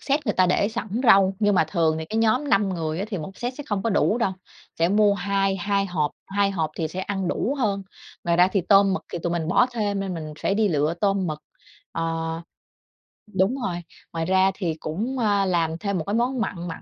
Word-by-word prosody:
set 285 +1 -1
người - - +2
ta 185 -1 +4
để 200 +3 +2
sẵn 225 -1 -3
rau. 195 -5 +5
Nhưng 205 -2 +3
mà 160 - +4
thường 160 -1 +1
thì 160 - -4
cái 215 - -5
nhóm 240 +6 +2
5 195 0 +3
người 165 -3 -2
á, 195 - -1
thì 195 -5 -3
1 190 +5 -8
set 245 +1 -3
sẽ 290 - -8
không 200 -2 -1
có 230 - 0
đủ 210 +3 +2
đâu, 195 -5 +1 0.5
sẽ 165 - +3
mua 205 +1 +4
hai 195 0 0
hai 200 +2 0
hộp, 155 -5 -1 0.2
2 200 0 +1
hộp 160 -5 -1
thì 160 - -1
sẽ 180 +4 -5
ăn 190 -2 -2
đủ 275 - -1
hơn. 200 -5 0 0.4
Ngoài 170 0 +2
ra 180 +1 +6
thì 195 - +2
tôm 195 -1 +6
mực - - -2
thì 175 - -2
tụi 175 - -1
mình 165 -1 -2
bỏ 240 - +4
thêm 205 -4 -1
nên 190 -2 -3
mình 155 -2 -6
phải 195 - +1
đi 215 -1 +2
lựa 150 0 +1
tôm 195 -2 +1
mực. 155 -1 -3 0.5
À. 165 - -2 1.3
Đúng 190 +7 +2
rồi. 175 -2 -2 0.4
Ngoài 165 -1 -2
ra 190 +2 +3
thì 170 -5 -2
cũng, 220 +12 -3
à, 205 -3 +2
làm 165 -3 0
thêm 200 0 -2
một 160 - -3
món 245 +2 0
mặn 175 -5 -3
mặn 165 - -7
195 Hz, 235 wpm, -24 LUFS, 170-205 Hz, 1.3 s, ra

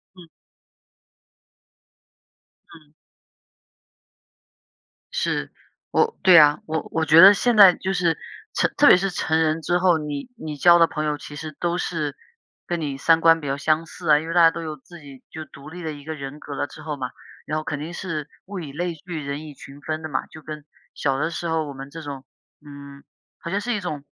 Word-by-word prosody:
嗯。 180 -2 -14 2.5
嗯。 155 -2 -20 2.2
是， - - -2 0.4
我 455 0 +1
对 185 - +7
呀， 150 -2 +7
我 160 0 -3
我 160 0 0
觉 160 +1 +7
得 195 +3 +10
现 240 +3 +1
在 200 -4 +9
就 190 +1 -3
是 175 -3 +1 0.4
成 - - +1
特 290 - +6
别 - - +8
是 195 +2 -1
成 160 -2 0
人 160 0 +1
之 175 +2 +1
后， 180 -2 +3
你 150 - -5
你 155 -9 -7
交 175 +4 +6
的 165 - +6
朋 155 -1 -4
友 150 -1 -1
其 145 +1 -10
实 155 0 -7
都 175 0 -1
是 155 -5 -3 0.5
跟 175 -1 -3
你 140 -3 -3
三 165 +4 +3
观 165 0 +5
比 145 - -7
较 135 +1 -1
相 155 +3 +1
似 170 0 -8
啊。 150 -1 +6
因 160 - -7
为 165 - -3
大 175 - +5
家 165 -1 +7
都 - - -6
有 155 -2 -5
自 175 +5 -15
己 140 -3 -14
就 160 -1 -8
独 140 0 -13
立 180 +3 -9
的 160 - -3
一 145 -1 -11
个 160 +2 -5
人 140 0 -8
格 145 - -8
了 145 - -2
之 155 - -13
后 150 -1 -5
嘛， 130 -2 -4 0.4
然 155 - -2
后 155 - -3
肯 150 -2 -4
定 160 +4 -6
是 155 -5 -5 0.2
物 200 0 -6
以 155 -5 -7
类 175 +4 -3
聚， 160 0 -7
人 140 +2 -5
以 150 - -10
群 140 +1 -13
分 155 +1 -4
的 155 - -6
嘛， 130 - -2
就 155 - -13
跟 150 -1 -9 0.3
小 135 -2 -1
的 155 +3 -1
时 170 0 -5
候 160 -1 0
我 145 - -7
们 135 +1 -9
这 165 +3 -9
种， 140 -3 -8 0.4
嗯 140 -1 -12 0.4
好 - - -7
像 200 +3 -1
是 245 +3 -2
一 215 - -1
种 155 -7 -5
155 Hz, 230 characters per minute, -23 LUFS, 145-170 Hz, 2.5 s, 得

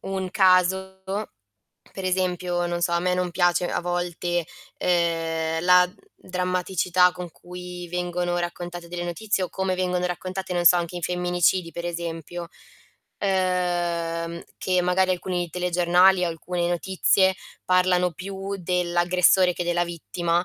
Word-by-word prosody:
un 190 -1 -4
caso, 190 0 +3 0.9
per 190 - -7
esempio, 180 -1 0
non 175 0 -2
so, 175 0 +1
a 170 - +2
me 180 +1 +1
non 180 -1 -1
piace 175 0 +2
a - - -1
volte, 175 -1 -2 0.3
ehm, 165 -2 0
la, 180 0 +6
mhmm, 180 - -19 0.2
drammaticità 180 0 +1
con 180 -1 -8
cui 180 0 -9
vengono 175 0 -2
raccontate 175 0 -5
delle 175 0 -5
notizie 195 +3 -1
o 180 - -1
come 190 -1 -1
vengono 180 -1 0
raccontate, 185 +1 -4
non 175 -1 0
so, 175 +1 +8
anche 175 0 -2
in 175 - -5
femminicidi 180 0 +1
per 170 - -6
esempio, 170 0 -5 0.7
ehm, 175 -3 -1 0.2
che 185 -1 +1
magari 185 +1 +2
alcuni 180 -1 -2
telegiornali 180 +1 +3
o - - 0
alcune 170 +1 -3
notizie 190 +2 +2 0.3
parlano 180 -1 +3
più 195 +3 -6
dell'aggressore 180 +1 +3
che 175 - -3
della 175 0 +1
vittima, 170 0 -2
180 Hz, 140 wpm, -24 LUFS, 175-185 Hz, 0.9 s, so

